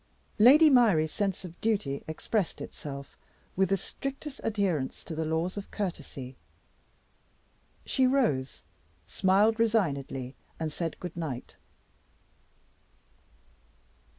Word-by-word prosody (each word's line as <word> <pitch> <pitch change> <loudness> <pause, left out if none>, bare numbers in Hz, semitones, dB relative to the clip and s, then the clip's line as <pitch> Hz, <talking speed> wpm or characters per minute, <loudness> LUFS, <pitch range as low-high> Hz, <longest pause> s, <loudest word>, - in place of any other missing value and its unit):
Lady 280 +9 +8
Myrie's 215 - +5
sense 195 0 -2
of 175 -1 -11
duty 200 -11 0
expressed 175 +4 -2
itself, 140 -1 -8 0.4
with 190 0 +2
the 195 - +3
strictest 275 - -6
adherence 195 -11 -1
to 165 - -7
the 160 0 -2
laws 165 +5 -1
of 200 - -6
courtesy. 145 -9 -5 1.5
She 260 -2 +2
rose, 225 - +1 0.4
smiled 205 +4 +3
resignedly, 140 - 0 0.3
and 160 -1 -2
said, 165 +1 -4
"Good 180 -2 -6
night." 150 -8 -5
185 Hz, 100 wpm, -29 LUFS, 155-220 Hz, 1.5 s, Lady